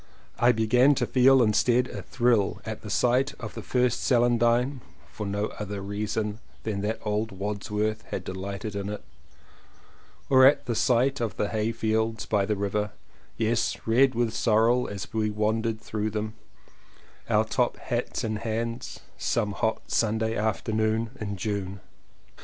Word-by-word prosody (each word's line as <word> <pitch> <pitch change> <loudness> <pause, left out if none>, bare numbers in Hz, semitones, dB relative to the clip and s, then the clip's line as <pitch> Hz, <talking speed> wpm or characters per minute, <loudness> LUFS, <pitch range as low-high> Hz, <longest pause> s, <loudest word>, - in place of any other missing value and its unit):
I 120 +1 +6
began 125 +5 +4
to - - 0
feel 130 0 +5
instead 120 +3 +3
a - - -7
thrill 120 -6 +1
at 110 -1 -5
the 105 - -8
sight 125 +6 +2
of 110 -3 -6
the - - -6
first 125 -1 +1
celandine 120 +2 +2 0.3
(for 105 - -5
no 100 +2 -1
other 105 -1 -4
reason 105 +2 -3 0.2
than 105 -3 -2
that 110 +2 -1
old 105 +1 -1
Wordsworth 105 +2 -2
had 95 - -4
delighted 100 +3 -5
in 100 0 -3
it) 105 - -5 1.2
or 130 -1 +6
at 140 - +3
the 120 - -1
sight 125 +4 +2
of 110 -4 -2
the 105 - 0
hay 110 0 0
fields 110 -1 -1
by 100 -2 +1
the 105 - +1
river 105 +1 -2 0.2
— - - -31
yes, 115 +1 +1
red 130 +3 +4
with 115 -2 0
sorel 115 +2 +3
as 100 -2 -7
we 110 -1 +1
wandered 110 +1 0
through 110 -1 -3
them, 110 0 -3 1.0
our - - +3
top - - 0
hats - - -3
in 110 -1 -1
hands, 115 +3 -4 0.2
some 110 -3 0
hot 110 +2 -2
Sunday 110 0 +1
afternoon 110 +1 0
in 100 -2 -4
June. 100 0 -3
110 Hz, 155 wpm, -27 LUFS, 105-120 Hz, 1.2 s, I